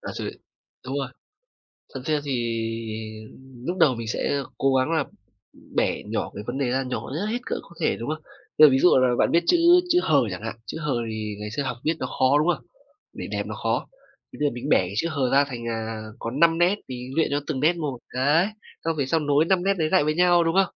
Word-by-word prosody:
à, - - -6
rồi, - - -3 0.6
đúng 135 +2 -3
rồi. 135 - -2 0.9
Thật 130 - -5
ra 155 -1 +1
thì 140 - -3 1.3
lúc 180 +4 -2
đầu 140 -8 +4
mình 115 -1 -6
sẽ 140 +5 -1
cố 135 0 +2
gắng 130 +5 +2
là 155 -4 +1 0.7
bẻ - - +1
nhỏ - - -3
cái 105 - -6
vấn 120 +2 -3
đề 135 -3 0
ra, 135 +1 +1
nhỏ 125 0 -4
nhất 180 +6 -2
hết 225 +3 -1
cỡ - - -2
có 170 - -17
thể, - - +2
đúng 120 +5 -5
không? 155 0 -4 0.3
Bây 155 0 +10
giờ - - +4
ví 130 - +3
dụ 180 - +6
là 130 -1 +3
bạn - - +4
viết 170 +1 +3
chữ - - +5 0.3
chữ 355 +1 +5
"h" - - -1 0.2
chẳng 90 +3 -6
hạn, 110 0 -4
chữ - - -6
"h" 150 -2 -3 0.2
thì 110 -1 -4
ngày 105 0 -5
xưa 140 +6 -2
học 125 -3 -3
viết 160 - +2
nó - - -2
khó, 130 +2 +3
đúng 155 - +2
không? - - -18 0.5
Để - - -6
đẹp - - -2
nó - - -5
khó. - - 0 0.5
Thì - - -11
bây 150 - +2
giờ - - -9
mình 120 +4 -5
bẻ - - +6
cái 90 +1 -3
chữ 165 - +1
h 135 -5 0
ra 140 +1 +5
thành, 120 -3 -6
à, 110 -1 -4 0.2
có 115 - -4
5 165 +4 +3
nét 175 +3 +4
thì 125 0 -6
luyện 160 - +3
cho 145 - +1
từng 140 -4 -2
nét 160 +5 +4
một. 145 -6 -3
Đấy, 145 +8 +3 0.4
xong 165 -1 0
về 140 - +1
sau 160 +5 +1
nối 145 +1 +2
5 185 0 +2
nét 195 +1 +3
đấy 155 -2 +1
lại 185 -5 +5
với 155 +1 0
nhau, 175 -1 +5
đúng 165 +1 0
không? 195 -1 +2
145 Hz, 255 wpm, -24 LUFS, 125-165 Hz, 1.3 s, Bây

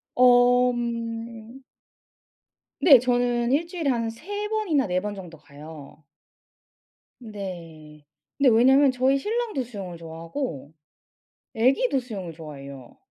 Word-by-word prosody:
어 245 0 +5
음. 230 0 -5 1.2
네. 275 -6 +7
저는 245 0 0
1 310 +5 +1
주일에 340 -4 -3
한 230 -3 0
3 405 - -6
번이나 370 - 0
4 180 0 0
번 210 +1 -4
정도 175 -4 -10
가요. 150 0 -13 1.2
네. 170 - -9 0.3
근데 275 -2 +4
왜냐면 265 +4 +5
저희 260 +2 +2
신랑도 435 - -2
수영을 195 -7 -8
좋아하고 165 - -6 0.8
애기도 265 - +2
수영을 200 -9 -7
좋아해요. 140 -5 -11
235 Hz, 205 characters per minute, -24 LUFS, 170-265 Hz, 1.2 s, 네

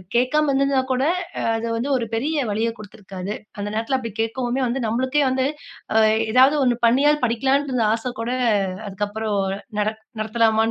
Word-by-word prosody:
கேக்காம 295 +5 +2
இருந்திருந்தா 275 0 +2
கூட, 255 +1 0 0.4
அ, - - -2 0.2
அது 230 +1 -3
வந்து 250 +5 -2
ஒரு 235 - -2
பெரிய 295 +7 -1
வலியைக் 225 +2 -1
குடுத்திருக்காது. 195 -2 -7 0.2
அந்த 205 0 -3
நேரத்துல 230 +4 0
அப்படி 230 -3 -5
கேக்கவுமே 245 +3 -1
வந்து, 245 +3 -1
நம்மளுக்கே 260 +6 +1
வந்து, 260 0 0 0.5
அ, - - +3 0.3
ஏதாவது 260 +5 +6
ஒண்ணு 245 -2 +3
பண்ணியாவது 290 +4 +3
படிக்கலான்ட்டு 270 +4 +1
இருந்த 240 -3 +1
ஆசை 230 +2 -3
கூட, 230 - -3 0.6
அதுக்கு 200 +1 -2
அப்புறம் 215 0 -2 0.4
நடத் 215 +1 -1 0.2
நடத்தலாமான்ற 220 0 +2
235 Hz, 165 wpm, -22 LUFS, 220-265 Hz, 0.6 s, ஏதாவது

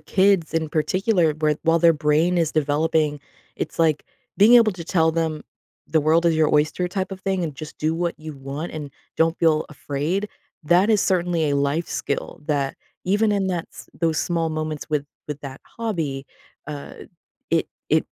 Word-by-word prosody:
kids 190 -4 +2
in 160 -1 0
particular, 175 +1 +1
where 155 -1 +1
while 165 0 +3
their 165 0 +6
brain 155 +4 +2
is 165 -2 +1
developing, 150 0 +1 0.4
it's - - -5
like 155 -3 +2 0.3
being 220 +5 +7
able 230 -3 +6
to 175 -2 -8
tell 160 -2 +2
them, 160 -2 -1 0.4
"The 160 - +2
world 160 +3 +3
is 165 - +4
your 155 -1 +3
oyster" 155 +4 +2
type 190 +1 -3
of 190 - -7
thing 190 -2 -1
and 155 -4 -3
just 155 +1 -9
do 155 +1 0
what 170 0 -1
you 155 0 -7
want 140 +5 -6
and 150 -3 -6 0.3
don't 165 +1 +2
feel 160 -2 +3
afraid, 155 +8 -2 0.3
that 180 +7 +4
is 210 - +4
certainly 175 -5 +1
a 140 - +1
life 140 +4 0
skill 140 - -3
that 140 -3 -1 0.3
even 205 +3 +2
in 195 -2 +1
that 175 -3 -2
s - - -12
those 165 -2 +1
small 165 -2 0
moments 155 -1 -4
with 145 -2 0 0.2
with 150 -1 -5
that 135 -1 -8
hobby, 160 -12 -4 0.4
uh, 145 -1 -7 0.6
it - - +2 0.2
it - - +3
160 Hz, 180 wpm, -23 LUFS, 150-180 Hz, 0.6 s, being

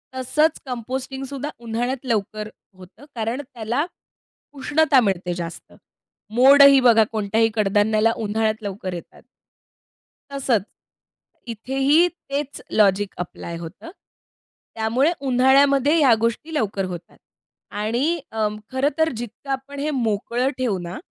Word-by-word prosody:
तसंच 300 +5 +1
कंपोस्टिंगसुद्धा 265 +3 -5
उन्हाळ्यात 240 +3 -3
लवकर 215 -2 -2 0.3
होतं 185 +10 -15
कारण 230 +4 -2
त्याला 240 +5 -1 0.7
उष्णता 290 0 +3
मिळते 185 -5 -1
जास्त. 170 -1 -7 0.6
मोड 275 +4 +7
ही 275 -1 +8
बघा 230 -3 +5
कोणत्याही 220 +1 +1
कडधान्याला 215 +2 +2
उन्हाळ्यात 220 +1 -1
लवकर 195 -2 -5
येतात. 175 -1 -9 1.1
तसंच, 260 -7 0 0.9
इथेही 270 +8 +2
तेच 285 -5 -6
लॉजिक 200 -1 +2
ॲप्लाय 170 -1 -6
होतं. 170 - -9 0.8
त्यामुळे 235 +8 +1 0.2
उन्हाळ्यामध्ये 275 +3 +4
ह्या 270 -6 +6
गोष्टी 235 +8 -2
लवकर 205 -8 -1
होतात 175 -2 -8 0.6
आणि 255 +11 0
अं, 215 -1 -1 0.2
खरं 260 +2 +1
तर 320 0 +3
जितकं 240 +4 -8
आपण 270 +1 -5
हे 300 - -1
मोकळं 240 0 -1
ठेवू 245 -7 0
ना, 175 +1 -6
235 Hz, 115 wpm, -22 LUFS, 210-275 Hz, 1.1 s, ही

